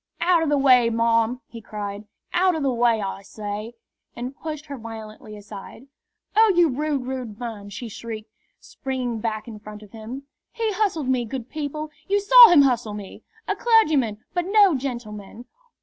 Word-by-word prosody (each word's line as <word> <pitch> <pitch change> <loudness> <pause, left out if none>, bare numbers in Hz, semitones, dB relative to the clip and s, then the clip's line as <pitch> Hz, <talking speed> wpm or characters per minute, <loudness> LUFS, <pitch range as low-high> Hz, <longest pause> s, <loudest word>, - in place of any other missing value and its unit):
"Out 345 -1 +3
o' 325 - 0
the 295 0 +2
way, 255 -4 +5
marm!" 230 +1 +1
he 230 - -11
cried. 205 -1 -6 0.3
"Out 365 0 +3
o' - - -2
the 275 -3 0
way, 235 -2 +2
I 195 0 -4
say!" 210 +2 -6 0.4
and 250 +3 -6
pushed 305 -1 -6
her 285 - -7
violently 220 -2 -9
aside. 205 +4 -11 0.5
"Oh, 440 0 +6
you 345 -2 +5
rude, 285 0 -2
rude 250 -5 -5
man!" 220 -4 -6
she 230 +4 -7
shrieked, 220 0 -8 0.3
springing 255 -4 -4
back 215 0 -3
in 220 -2 -9
front 210 0 -11
of 205 - -16
him. 230 +5 -8 0.3
"He 455 -2 -1
hustled 370 -9 0
me, 255 -2 +1
good 240 +1 -6
people; 305 0 -5 0.2
you 405 +1 +2
saw 475 +3 +9
him 310 -5 +7
hustle 240 -5 0
me! 205 -2 -9 0.3
A - - 0
clergyman, 310 - +3 0.2
but 355 -1 -1
no 400 -2 +5
gentleman! 235 -4 -6
245 Hz, 175 wpm, -23 LUFS, 220-305 Hz, 0.5 s, saw